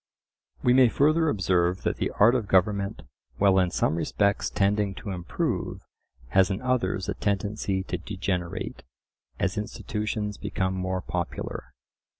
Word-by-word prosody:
We 125 - +5
may 130 -2 +6
further 155 +5 +3
observe 90 -5 +1
that - - 0
the - - -1
art 115 +4 +7
of 120 -5 0
government, 100 +1 +1 0.3
while 95 -1 +4
in 90 -1 +2
some - - +1
respects 100 +5 +1
tending 100 0 +1
to 100 - -6
improve, 90 -3 -3 0.5
has 95 +5 +4
in 95 - -1
others 120 -7 0
a - - -1
tendency 100 -1 -1
to - - -4
degenerate, 95 -3 -3 0.6
as 95 +1 0
institutions 105 0 -3
become 95 -2 -1
more 95 0 -2
popular. 90 -1 -4
100 Hz, 140 wpm, -26 LUFS, 95-105 Hz, 0.6 s, art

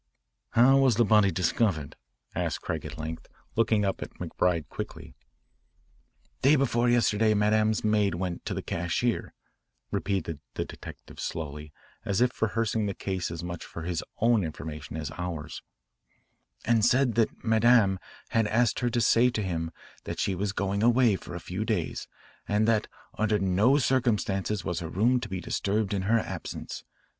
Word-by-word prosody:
"How 130 +4 +6
was 130 -4 +4
the 120 +2 +4
body 105 -2 +5
discovered?" 90 -3 0 0.4
asked - - -2
Craig - - -3
at - - -9
length, 80 +1 -6 0.3
looking 110 -2 +2
up 95 - -1
at - - -7
McBride 85 -5 -1
quickly. - - -7 1.3
"Day 140 +3 +6
before 120 -3 +2
yesterday 110 -2 +3
Madame's 105 +1 +2
maid 105 -4 +2
went 90 0 -3
to - - -2
the - - -4
cashier," 85 +8 -1 0.6
repeated 95 -6 -2 0.2
the - - -2
detective - - -11
slowly 75 -1 -5 0.3
as 100 0 0
if 125 0 +1
rehearsing 110 0 0
the 100 - -3
case 95 -3 -3
as 85 0 -6
much 85 -1 -5
for 85 - -8
his 85 -1 -2
own 115 -2 +3
information 80 0 -6
as 75 -2 -4
ours, 80 -3 -5 1.0
"and 115 -1 +3
said 125 +1 +4
that 115 -1 0
Madame 110 -3 +4 0.3
had 115 -2 +2
asked 115 +1 +2
her 120 - +1
to 120 0 0
say 120 +2 +5
to 110 -3 -2
him 80 -3 -2 0.4
that - - -5
she 100 - +1
was 100 +2 -1
going 100 0 -1
away 120 -2 +4
for - - -8
a - - -4
few - - -4
days - - -2 0.4
and 105 +2 +2
that 115 -2 +2 0.3
under 105 0 +2
no 100 +8 +3
circumstances 105 - 0
was 90 -3 -1
her 85 -2 -5
room 120 +8 +2
to 120 -3 -6
be 95 -1 -3
disturbed 100 +3 -1
in 100 - 0
her 115 - +5
absence. 110 - -5
105 Hz, 165 wpm, -28 LUFS, 90-115 Hz, 1.3 s, How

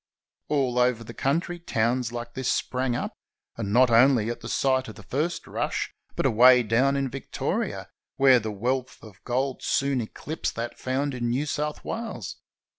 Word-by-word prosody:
All 130 -4 +1
over 125 -2 +2
the - - -9
country 170 +5 -1
towns 120 -5 0
like 120 0 -6
this 130 -1 -1
sprang 125 -1 -1
up, - - -3 0.4
and 100 - -4
not 125 +2 +5
only 120 -1 +5
at 120 - -6
the - - -8
site 130 -1 +1
of 110 - -9
the 100 - -12
first 150 - -2
rush, - - -2 0.2
but - - -1
away 125 +2 +7
down 125 +5 +2
in 135 -1 0
Victoria, 135 +1 -3 0.3
where 135 -2 +6
the 110 -1 -4
wealth 125 +5 -2
of 105 -2 -14
gold 130 +2 -1
soon 140 -2 +1
eclipsed 150 +7 -4
that 115 +1 -5
found 135 +2 -1
in 120 -2 -2
New 130 +5 0
South 150 +1 -3
Wales. 230 0 -5
125 Hz, 175 wpm, -26 LUFS, 120-135 Hz, 0.4 s, away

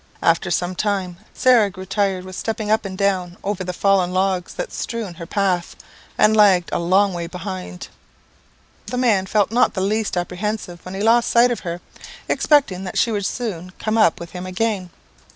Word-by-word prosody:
After 170 +2 +2
some 175 +2 0
time, 190 -3 -2
Sarah 240 -5 +4
grew 185 0 -9
tired 195 -1 -1
with 185 0 -8
stepping 215 +1 -3
up 220 -1 +2
and 190 -1 -5
down 185 -3 0
over 200 -2 -2
the 180 - -3
fallen 185 -1 +2
logs 185 -1 0
that - - -5
strewed 220 -7 -4
their 170 -2 -8
path, 185 -3 0 0.4
and 215 +1 +4
lagged 195 -5 +5
a - - +1
long 190 +3 +3
way 170 -1 -4
behind. 180 0 -7 1.0
The 250 - -3
man 215 -7 +2
felt 205 0 +1
not 240 +2 +3
the 190 - -1
least 210 0 0
apprehensive 180 0 -3
when 185 +1 -7
he 200 - -3
lost 230 +1 +4
sight 240 +1 +5
of 240 - -2
her, 175 -1 -5 0.5
expecting 260 -12 +2
that 185 - -5
she 235 - +2
would 200 -3 -1
soon 185 -7 -5
come 215 0 -2
up 215 -8 +4
with 170 -1 -9
him 180 0 -6
again. 190 -1 -1
190 Hz, 190 wpm, -21 LUFS, 180-215 Hz, 1.0 s, lagged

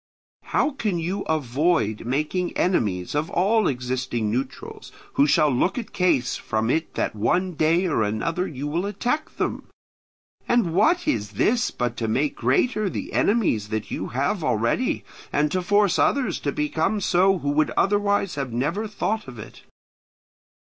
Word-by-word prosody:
How 305 - +1
can 215 -10 -2
you 180 +5 -2
avoid 140 -6 0
making 155 +7 -1
enemies 100 - 0
of 150 +3 -1
all 210 +6 +2
existing 125 -3 -2
neutrals 130 +3 -5 0.2
who 140 - +4
shall 150 0 +4
look 175 - +1
at 235 - -5
case 170 -9 +1
from 110 +1 -1
it 160 +3 -1
that - - -1
one 180 - +1
day 165 +4 +2
or 160 -10 +1
another 160 - -1
you 140 -1 -6
will 170 +6 -1
attack 245 +9 -2
them? - - -2 0.8
And 230 -9 +2
what 330 - +3
is 105 -2 -1
this 230 - +2
but 120 -1 -3
to 115 - -2
make 135 +7 0
greater 200 - +1
the - - -5
enemies 180 - +1
that 110 -1 -4
you - - -3
have 140 - -1
already, 120 - 0 0.3
and 150 0 +1
to 185 - 0
force 205 0 +2
others 275 -2 +1
to 140 - -2
become 160 +8 0
so 190 +1 +3
who 145 -4 -2
would 155 +1 +2
otherwise 205 -1 +2
have 135 -4 -4
never 150 - -1
thought 215 -2 -2
of 125 -2 -9
it? 110 - -11
160 Hz, 160 wpm, -24 LUFS, 125-195 Hz, 0.8 s, who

